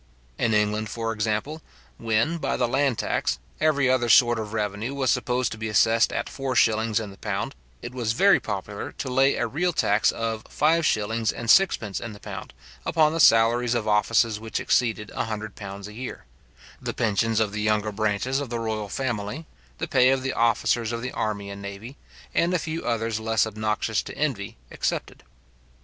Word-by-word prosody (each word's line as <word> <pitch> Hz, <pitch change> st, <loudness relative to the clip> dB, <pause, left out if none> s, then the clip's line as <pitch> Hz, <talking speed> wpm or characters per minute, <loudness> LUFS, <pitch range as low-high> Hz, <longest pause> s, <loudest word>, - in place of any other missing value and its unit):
In 110 Hz, -2 st, +2 dB
England, 105 Hz, 0 st, +1 dB
for 115 Hz, 0 st, -3 dB
example, 110 Hz, +8 st, -2 dB, 0.4 s
when, 115 Hz, +10 st, +1 dB
by -, -, -1 dB
the 125 Hz, -, +1 dB
land 135 Hz, -1 st, +1 dB
tax, -, -, -1 dB, 0.2 s
every 145 Hz, -4 st, +3 dB
other 130 Hz, -2 st, +2 dB
sort 120 Hz, 0 st, +6 dB
of 105 Hz, -1 st, -5 dB
revenue 110 Hz, +4 st, -2 dB
was 130 Hz, -3 st, +1 dB
supposed 125 Hz, -1 st, 0 dB
to 110 Hz, -, -7 dB
be 110 Hz, 0 st, -3 dB
assessed 115 Hz, +2 st, +3 dB
at -, -, -2 dB
four 135 Hz, -2 st, -4 dB
shillings 110 Hz, -1 st, +3 dB
in 105 Hz, -3 st, -6 dB
the 95 Hz, -, -15 dB
pound, -, -, -3 dB, 0.3 s
it 120 Hz, -, -6 dB
was 120 Hz, -3 st, -1 dB
very 195 Hz, +10 st, +5 dB
popular 100 Hz, 0 st, -5 dB
to 130 Hz, -, -5 dB
lay 135 Hz, +2 st, +4 dB
a -, -, 0 dB
real 175 Hz, +5 st, 0 dB
tax 105 Hz, -9 st, +2 dB
of 115 Hz, -1 st, -3 dB
five 160 Hz, +2 st, +2 dB
shillings 110 Hz, +1 st, 0 dB
and 115 Hz, -1 st, 0 dB
sixpence 110 Hz, -, +3 dB
in 115 Hz, -2 st, -6 dB
the 105 Hz, -, -12 dB
pound -, -, -8 dB, 0.3 s
upon 155 Hz, -1 st, +3 dB
the 165 Hz, -, -2 dB
salaries 120 Hz, -1 st, +5 dB
of 115 Hz, -3 st, -1 dB
offices 110 Hz, +1 st, +2 dB
which 110 Hz, 0 st, -4 dB
exceeded 110 Hz, -4 st, 0 dB
a -, -, -2 dB
hundred 110 Hz, -1 st, -5 dB
pounds 100 Hz, -1 st, -8 dB
a 105 Hz, -, -10 dB
year; 125 Hz, +3 st, -7 dB, 0.6 s
the -, -, -4 dB
pensions 115 Hz, 0 st, +1 dB
of 110 Hz, -2 st, +1 dB
the 105 Hz, +1 st, -3 dB
younger 105 Hz, 0 st, +1 dB
branches 110 Hz, +5 st, 0 dB
of 140 Hz, -4 st, -4 dB
the 120 Hz, -, -2 dB
royal 110 Hz, -2 st, -3 dB
family, 120 Hz, -, -3 dB, 0.3 s
the -, -, -3 dB
pay 130 Hz, 0 st, +4 dB
of 135 Hz, -1 st, +1 dB
the 130 Hz, -, -1 dB
officers 115 Hz, 0 st, +1 dB
of 115 Hz, 0 st, -4 dB
the 130 Hz, -, -3 dB
army 100 Hz, -2 st, -3 dB
and 100 Hz, 0 st, -8 dB
navy, 100 Hz, +6 st, -8 dB, 0.4 s
and 175 Hz, +2 st, +2 dB
a -, -, +4 dB
few 160 Hz, 0 st, -4 dB
others 115 Hz, -2 st, -1 dB
less 110 Hz, 0 st, +1 dB
obnoxious 110 Hz, 0 st, -1 dB
to -, -, -9 dB
envy, 125 Hz, -, -2 dB
excepted. -, -, -3 dB
115 Hz, 195 wpm, -25 LUFS, 105-130 Hz, 0.6 s, sort